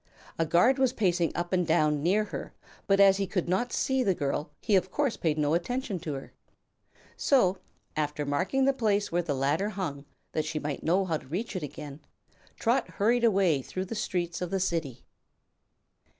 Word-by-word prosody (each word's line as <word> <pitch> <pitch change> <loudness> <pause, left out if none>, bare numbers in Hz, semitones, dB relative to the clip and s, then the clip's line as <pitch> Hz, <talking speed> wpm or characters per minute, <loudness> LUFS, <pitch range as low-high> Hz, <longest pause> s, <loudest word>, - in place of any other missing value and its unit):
A 165 - +2
guard 235 - +4
was 260 -2 +3
pacing 175 - +1
up 175 +1 -3
and 180 -2 +2
down 150 -3 +2
near 195 +7 +2
her, 210 - -7 0.3
but 195 0 +3
as 195 -1 +7
he 195 -1 -1
could 180 -2 -2
not 215 +8 0
see 265 -1 +1
the 195 -7 +2
girl 145 0 -2
he 215 - +1
of 185 0 +2
course 280 +2 0
paid 155 -2 0
no 150 0 +1
attention 200 +3 -1
to 160 -3 -4
her. 135 - -9 0.8
So, 190 -9 +3 0.4
after 150 -1 -1
marking 185 - +1
the 275 - +4
place 210 -5 0
where 175 +1 +2
the 160 -5 -2
ladder 145 +9 +1
hung, 165 -9 -4 0.3
that 155 - 0
she 155 0 -3
might 150 -2 -3
know 185 +4 +2
how 165 -3 0
to - - -15
reach 190 - -4
it 185 - -2
again, 145 0 -7 0.6
Trot - - +1
hurried 235 +4 +1
away 190 -10 +3
through 185 +8 -5
the 190 - -6
streets 175 -6 -2
of 180 - -2
the 195 - -1
city. 165 -9 -2
180 Hz, 195 wpm, -28 LUFS, 155-205 Hz, 0.8 s, as